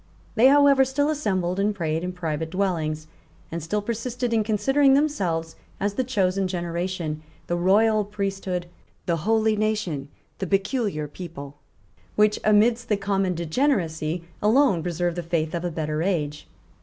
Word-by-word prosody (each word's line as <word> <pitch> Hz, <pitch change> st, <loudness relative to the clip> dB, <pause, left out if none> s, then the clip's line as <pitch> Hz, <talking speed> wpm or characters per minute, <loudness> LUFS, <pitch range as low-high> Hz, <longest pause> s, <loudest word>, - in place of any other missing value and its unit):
They, 235 Hz, +3 st, +6 dB
however, 280 Hz, -1 st, +6 dB
still 285 Hz, +3 st, +1 dB
assembled 190 Hz, -, -1 dB
and 205 Hz, +1 st, +1 dB
prayed 160 Hz, -3 st, -1 dB
in 180 Hz, -, -2 dB
private 160 Hz, -3 st, -3 dB
dwellings, 160 Hz, -5 st, -1 dB, 0.5 s
and 170 Hz, +1 st, -3 dB
still 205 Hz, +7 st, -2 dB
persisted 235 Hz, +2 st, -2 dB
in 220 Hz, -1 st, +3 dB
considering 270 Hz, +6 st, +3 dB
themselves 180 Hz, -, 0 dB, 0.2 s
as 205 Hz, 0 st, 0 dB
the 260 Hz, -, 0 dB
chosen 195 Hz, -6 st, 0 dB
generation, 175 Hz, -3 st, -3 dB, 0.2 s
the 175 Hz, -, -1 dB
royal 210 Hz, +5 st, +3 dB
priesthood, 195 Hz, -3 st, -3 dB, 0.4 s
the 170 Hz, -1 st, +1 dB
holy 220 Hz, +5 st, +2 dB
nation, 210 Hz, -10 st, -1 dB, 0.3 s
the 190 Hz, -, -2 dB
peculiar 195 Hz, -, 0 dB
people, 145 Hz, -3 st, -9 dB, 0.6 s
which, 210 Hz, 0 st, +3 dB
amidst 225 Hz, +3 st, +3 dB
the 210 Hz, -, +2 dB
common 195 Hz, -2 st, 0 dB
degeneracy, 170 Hz, -, 0 dB, 0.2 s
alone 220 Hz, -, +4 dB
preserved 175 Hz, 0 st, -2 dB
the -, -, -1 dB
faith 165 Hz, -1 st, -1 dB
of 170 Hz, 0 st, -2 dB
a 175 Hz, -, -1 dB
better 155 Hz, -1 st, -2 dB
age. 150 Hz, -5 st, -2 dB
190 Hz, 145 wpm, -24 LUFS, 165-215 Hz, 0.6 s, They